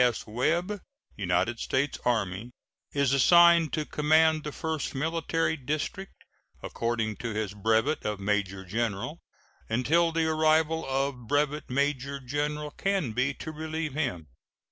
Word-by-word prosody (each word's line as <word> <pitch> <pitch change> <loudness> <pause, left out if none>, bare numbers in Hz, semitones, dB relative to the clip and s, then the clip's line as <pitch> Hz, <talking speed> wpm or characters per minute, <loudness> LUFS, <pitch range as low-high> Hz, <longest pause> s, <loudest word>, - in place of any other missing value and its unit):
S. 120 -2 +1
Webb, 170 - -1 0.3
United 100 +5 0
States 135 +2 -1
Army, 110 -2 -1 0.4
is 140 -2 +1
assigned 170 +3 +6
to 155 -1 -1
command 155 +1 +3
the 150 - -4
First 160 -1 -3
Military 165 +2 0
District, 155 +7 -4 0.4
according 115 -2 -2
to 115 -3 -4
his 105 -2 -2
brevet 110 +8 +1
of 105 -1 -2
major 100 -1 -1
general, 105 0 -2 0.5
until 155 +9 +2
the 165 0 +1
arrival 160 0 +2
of 135 -3 -2
Brevet 145 +1 0
Major 140 +1 -1
General 150 +3 -3
Canby 145 - 0
to 155 - -6
relieve 155 -1 -4
him. 125 - -2
140 Hz, 125 wpm, -28 LUFS, 115-160 Hz, 0.5 s, assigned